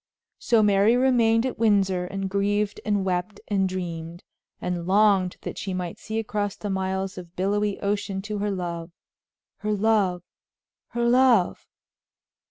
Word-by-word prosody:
So 230 -2 +3
Mary 205 +3 +4
remained 235 -3 +3
at 260 - -3
Windsor 195 -5 +2
and 195 +1 -4
grieved 200 +1 0
and 205 -2 0
wept 185 +2 -2
and 195 -2 +1
dreamed, 170 -2 -5 0.4
and 175 -1 -3
longed 195 -2 +3
that - - -6
she 190 -2 -3
might 180 -2 -4
see 220 0 -5
across 205 -2 -2
the 205 - -5
miles 190 0 -2
of 175 -1 -12
billowy 205 +2 0
ocean 200 -1 -1
to 210 0 -4
her 205 +1 -1
love! 170 -3 -4 0.7
her 215 0 -2
love! 200 -4 +1 0.6
her 235 0 -1
love! 245 -6 +3
200 Hz, 145 wpm, -25 LUFS, 185-210 Hz, 0.7 s, Mary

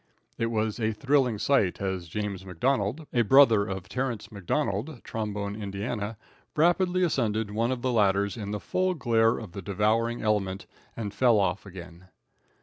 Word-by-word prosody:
It 115 - +1
was 110 -1 -1
a 110 -1 0
thrilling 130 0 +2
sight 105 -5 +2
as 95 -3 -3
James 100 +1 -4
McDonald, 110 - -1
a 120 - +3
brother 115 -3 +6
of 95 -2 -5
Terrance 125 -4 -3
McDonald, 110 - -2
Trombone, 105 -2 -4
Ind., 105 +2 -4 0.4
rapidly 180 +3 +3
ascended 110 - 0
one 115 +4 0
of 125 -2 -3
the 130 - +1
ladders 100 -3 +2
in 105 -4 -5
the 105 0 -3
full 185 - 0
glare 115 -4 +2
of - - -8
the 100 - -7
devouring 110 +5 0
element 100 -3 0 0.3
and 105 -3 -4
fell 120 -4 +4
off 100 +1 -1
again. 90 -1 -11
110 Hz, 155 wpm, -27 LUFS, 100-120 Hz, 0.4 s, brother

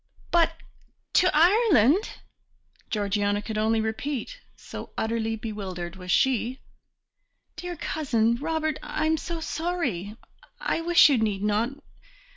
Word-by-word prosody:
"But 330 -1 +3 0.6
to 365 - +5
Ireland!" 345 - +4 0.8
Georgiana 205 -1 0
could 215 +1 -4
only 220 +1 +2
repeat, 270 - -3 0.2
so - - -9
utterly 225 0 -1
bewildered 195 -5 -6
was 180 -1 -10
she. 255 +4 +2 1.0
"Dear 355 0 -5
Cousin 240 -8 0
Robert, 315 +1 -2
I 310 - -2
am 320 0 +2
so 335 +2 -5
sorry; 315 - -3 0.4
I - - -1
wish 345 -1 +6
you 270 -5 +3
need 205 -3 -1
not 220 +7 -1
240 Hz, 115 wpm, -26 LUFS, 215-320 Hz, 1.0 s, wish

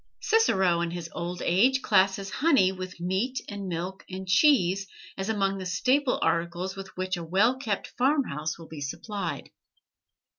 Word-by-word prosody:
Cicero, 190 - +3
in 170 - -1
his 170 -1 -6
"Old 175 +1 -4
Age," 250 +10 +3
classes 195 -1 +2
honey 265 - +3
with 185 -1 -7
meat 190 +9 -1
and 200 -2 -6
milk 180 +2 -4
and 190 0 -6
cheese 195 - +4 0.3
as 195 +2 -4
among 195 -2 0
the 185 - -5
staple 255 - +2
articles 170 +3 -1
with 195 0 -7
which 185 0 -2
a 170 - -5
well 205 +10 +2
kept 215 -7 -2
farm 275 +3 +3
house 155 - -4
will 165 -1 -11
be 155 -2 -9
supplied. 170 +2 -5
190 Hz, 160 wpm, -27 LUFS, 175-220 Hz, 0.3 s, cheese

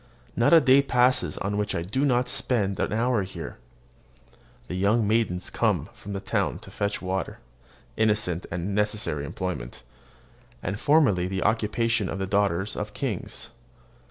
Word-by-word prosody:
Not 120 - +3
a 165 - +9
day 135 -2 +5
passes 125 -1 +2
on 100 +1 -2
which 105 0 -1
I 85 - -1
do 110 +10 -1
not 125 -2 +2
spend 105 -6 +1
an - - 0
hour 115 0 +1
there. 95 - -8 1.1
The - - -6
young 100 +4 +2
maidens 105 -5 0
come - - 0
from 100 - -9
the 100 - -3
town 95 - -1
to - - -12
fetch 100 -1 -2
water, 95 +1 -3 0.6
innocent 105 -5 +1
and 90 +4 -3
necessary 105 -8 -1
employment, 75 -8 -5 0.8
and 100 +3 -3
formerly 140 - +3
the 95 0 -2
occupation 115 -1 +1
of - - -3
the 95 - -2
daughters 100 0 0
of 105 0 -5
kings. 120 -9 -3
105 Hz, 155 wpm, -26 LUFS, 95-115 Hz, 1.1 s, a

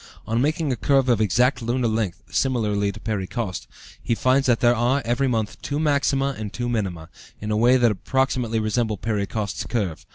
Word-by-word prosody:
On 115 +2 0
making 155 +1 0
a - - 0
curve 135 +1 +2
of 115 -3 +3
exact 120 +7 +2
lunar 120 +1 0
length 110 -6 -2
(similarly 105 -6 +1
to 105 - -11
Perry 105 -3 -3
Coste), 105 -6 -4 0.3
he 115 - 0
finds 130 +3 +2
that 120 -2 +3
there 120 0 +4
are, 125 +4 +1
every 120 +4 +1
month, 110 -4 -2
two 145 +1 -3
maxima 140 -2 +1
and 105 -2 -5
two 120 -1 -3
minima, 95 -9 -2 0.3
in 105 0 -4
a - - +1
way 120 +4 +5
that 120 -3 +4
approximately 125 +2 0
resemble 110 0 0
Perry 105 -2 -2
Coste's 105 -3 -4
curve. 100 -9 -3
115 Hz, 195 wpm, -23 LUFS, 105-130 Hz, 0.3 s, way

